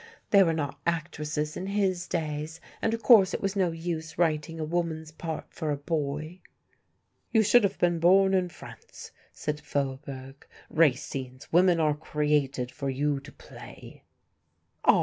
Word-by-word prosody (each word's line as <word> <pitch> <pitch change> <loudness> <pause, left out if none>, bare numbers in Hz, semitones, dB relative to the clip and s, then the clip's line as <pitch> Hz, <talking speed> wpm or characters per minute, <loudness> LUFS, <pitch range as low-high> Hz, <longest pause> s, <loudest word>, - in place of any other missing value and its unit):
There 200 -2 +7
were 165 - +2
not 145 -3 -3
actresses 155 -2 -2
in 185 - -4
his 195 -3 0
days, 155 -1 -3 0.2
and 225 0 +1
of 230 - -10
course 200 -7 +6
it - - -2
was 195 0 -1
no 185 -3 +2
use 165 -1 -5
writing 160 -1 0
a - - -1
woman's 160 -1 -2
part 160 0 -6
for 155 - -3
a 145 - 0
boy." 155 +3 -3 0.9
"You 220 -2 +4
should 220 +3 +5
have 200 0 0
been 175 -1 +2
born 190 +3 +5
in 185 -1 +2
France," 160 - -12 0.2
said 150 0 -4
Faubourg, 135 -1 -5 0.2
"Racine's 130 -4 0
women 175 0 +5
are 155 -2 +3
created 150 -4 0
for 140 0 -4
you 140 +1 0
to 145 +2 -13
play." - - -13 0.8
"Ah! - - +6
160 Hz, 155 wpm, -28 LUFS, 145-175 Hz, 0.9 s, There